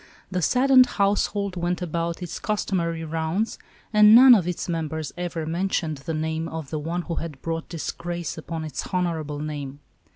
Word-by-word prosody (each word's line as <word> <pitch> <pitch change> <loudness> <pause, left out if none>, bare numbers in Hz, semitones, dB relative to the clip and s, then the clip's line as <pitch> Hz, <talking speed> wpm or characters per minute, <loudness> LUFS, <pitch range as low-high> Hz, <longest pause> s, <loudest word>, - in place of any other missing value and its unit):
The 180 -1 -1
saddened 255 - +5
household 200 -1 +1
went 175 0 -1
about 170 0 -3
its 175 - -5
customary 170 -6 -1
rounds, 160 +7 -2 0.3
and 210 +1 +8
none 255 +1 +10
of 190 -7 +3
its 180 - -3
members 160 -3 -3
ever 175 -2 -4
mentioned 165 -2 -1
the 160 +4 -4
name 160 +1 -2
of 160 -4 -6
the 155 - -2
one 170 +4 -3
who 170 -1 -4
had 155 -5 -7
brought 165 0 -3
disgrace 170 0 -4
upon 160 0 -5
its 150 -4 -5
honorable 165 -5 -1
name. 145 -2 -5
170 Hz, 165 wpm, -24 LUFS, 160-185 Hz, 0.3 s, none